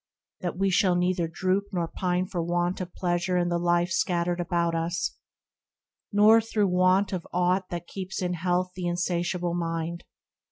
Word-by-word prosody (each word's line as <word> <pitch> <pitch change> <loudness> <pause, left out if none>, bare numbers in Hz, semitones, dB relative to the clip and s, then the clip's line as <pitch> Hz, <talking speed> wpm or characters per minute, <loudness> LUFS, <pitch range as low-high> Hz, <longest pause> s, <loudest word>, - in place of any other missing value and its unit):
that 175 -1 -4
we 195 0 +1
shall 185 -1 +3
neither 180 -1 +1
droop 185 +4 0
Nor 175 -3 -1
pine 180 +1 -1
for 180 -2 -3
want 175 +2 -1
of 180 -1 -5
pleasure 175 0 0
in 175 0 +1
the 175 0 0
life 175 +1 +1
Scattered 175 0 0
about 170 -1 0
us, 165 +1 -1 1.0
nor 215 +2 +6
through 215 -3 0
want 185 +2 +3
of 180 -2 -4
aught 180 +1 +1
That 175 -1 -5
keeps 190 +1 -6
in 180 -1 -1
health 180 +1 0
the 180 -1 -3
insatiable 175 0 -1
mind. 165 0 -3
180 Hz, 165 wpm, -27 LUFS, 175-185 Hz, 1.0 s, nor